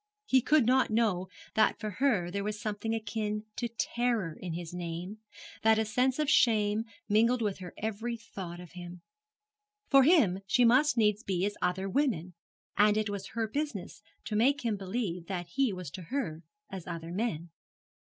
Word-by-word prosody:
He 260 -9 +4
could 295 0 +4
not 260 +2 +4
know 215 -5 +1 0.3
that 220 0 +3
for 215 -2 -4
her 200 -11 +2
there 200 +1 -2
was 210 0 -3
something 215 +2 -2
akin 215 -1 -3
to 240 - -2
terror 235 -5 -1
in 175 -3 -6
his 170 0 -6
name, 175 +4 -5 0.4
that 220 0 +5
a 220 - +1
sense 250 +4 +1
of 305 -1 0
shame 220 -5 +3 0.2
mingled 230 +3 +3
with 205 -3 -1
her 180 -1 -9
every 220 +2 -3
thought 190 -5 -8
of 180 -2 -11
him. 175 0 -9 0.9
For 275 -1 +8
him 255 - +4
she 245 +3 +4
must 255 +5 +4
needs 210 -2 +3
be 190 -4 -1
as 205 - -1
other 180 +2 0
women, 190 - 0 0.4
and 210 +1 +4
it 215 -1 0
was 200 -1 -5
her 225 -1 +1
business 230 -7 -4 0.2
to 215 - -3
make 275 +7 +3
him 225 -3 +1
believe 190 -3 -3
that 175 -3 -4
he 260 +6 +1
was 180 -6 -6
to 185 - -7
her 165 - -3 0.3
as 190 -2 -8
other 165 -1 -5
men. 175 -4 -2
210 Hz, 180 wpm, -30 LUFS, 180-235 Hz, 0.9 s, For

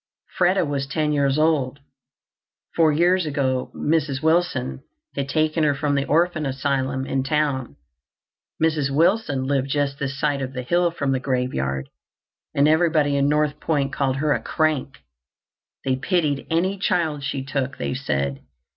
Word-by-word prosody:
Freda 180 0 +3
was 140 -2 -2
ten 150 +1 0
years 140 -1 +2
old. 150 -4 +1 1.0
Four 160 -2 +4
years 175 +3 +2
ago 130 -3 -1
Mrs. 150 -3 0
Wilson 160 -6 +1 0.3
had 140 -1 -3
taken 155 +2 +1
her 145 -2 +3
from 145 0 -1
the 140 -1 +1
orphan 165 0 +1
asylum 135 0 -1
in 135 0 -1
town. 135 - -1 0.8
Mrs. 155 -3 +1
Wilson 160 -1 +2
lived 135 0 0
just 140 0 -1
this 140 -1 -3
side 145 -2 0
of 130 0 -4
the 125 -1 -4
hill 175 +7 +2
from 140 -5 -2
the 130 - +1
graveyard, 95 - -2 0.7
and 140 +1 +4
everybody 155 -2 +3
in 140 0 +2
North 150 0 +1
Point 140 -3 0
called 135 -2 0
her 145 +2 +1
a 115 - -2
"crank." 145 -4 -1 0.8
They 130 -1 +1
pitied 150 -2 0
any 185 +4 0
child 160 -6 0
she 140 -1 -3
took, 135 0 -2
they - - -2
said. 70 - -2
145 Hz, 155 wpm, -23 LUFS, 135-155 Hz, 1.0 s, Four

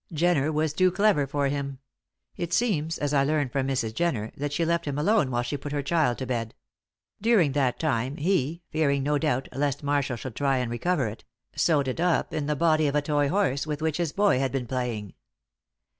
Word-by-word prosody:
Jenner 160 -2 +2
was 155 -1 0
too 185 +3 +4
clever 195 -7 +2
for 140 0 0
him; 140 -1 -3 0.6
it 175 -2 -4
seems, 165 -9 +1
as 145 0 -2
I 140 -1 +4
learn 145 -1 +1
from 135 +1 -1
Mrs. 120 -5 -1
Jenner, 120 -9 -1
that 145 +1 -3
she 165 +3 0
left 170 +1 0
him 145 -1 -3
alone 165 -1 +2
while 120 -1 0
she 135 +4 -3
put 145 - -7
her 145 -1 -1
child 145 -5 +1
to 130 - -4
bed. 115 -3 -3 0.7
During 210 -9 +4
that 135 -3 +1
time 135 -2 -1
he 170 -1 0
fearing, 140 -3 +1
no 145 +1 +1
doubt, 135 -4 0
lest 145 +1 -1
Marshall 140 -3 0
should 120 0 -7
try 135 -2 +1
and 125 -2 -2
recover 140 +4 0
it 105 +1 -8 0.3
sewed 145 -5 +2
it 130 - -3
up 175 0 +1
in 150 -2 -2
the 150 - 0
body 155 -1 +3
of 140 - -1
a 150 - +3
toy 145 -1 +1
horse 160 -7 0
with 150 -1 -3
which 155 -1 -1
his 170 -4 -1
boy 200 -9 +3
had 135 -1 0
been 135 -2 -2
playing. 120 -6 -3
145 Hz, 215 wpm, -26 LUFS, 135-160 Hz, 0.7 s, too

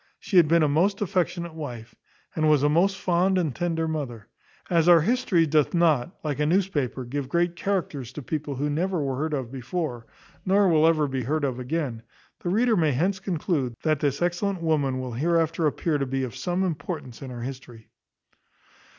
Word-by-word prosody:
She 190 - -1
had 170 -3 +7
been 165 +1 +4
a - - +4
most 180 +8 +2
affectionate 175 -3 -1
wife, 120 -8 -7 0.4
and 155 -1 +2
was 150 -2 +4
a 145 - +4
most 190 +6 +2
fond 185 +1 +2
and 160 -8 -1
tender 165 -2 -1
mother. 135 -9 -5 0.4
As 170 -1 +3
our 170 -2 +8
history 195 -4 +2
doth 155 +1 +2
not, 165 -2 +2
like 150 -2 -2
a 150 - +2
newspaper, 155 -8 0
give 135 +2 -4
great 175 0 +1
characters 170 - -2
to 150 - -7
people 145 +1 -3
who 140 +3 -1
never 175 +5 -1
were 135 -2 -2
heard 155 +2 -1
of 130 -4 -4
before, 130 -2 -4 0.4
nor 195 +1 +3
will 160 -2 +4
ever 155 -3 +3
be 130 -1 -2
heard 150 +5 -1
of 130 -3 -1
again, 125 -3 -3 0.4
the 175 - -3
reader 225 +4 +3
may 160 -6 +2
hence 185 +8 0
conclude, 160 - -2
that 155 -2 +1
this 145 +2 0
excellent 175 +1 -1
woman 145 -5 +1
will 130 -2 -5
hereafter 165 +4 +1
appear 150 +1 -1
to 135 - -1
be 135 +1 -1
of 125 -2 -5
some 175 +8 -1
importance 155 -7 -4
in 135 - -7
our 120 -1 -7
history. 125 -3 -9
155 Hz, 195 wpm, -25 LUFS, 135-175 Hz, 0.4 s, our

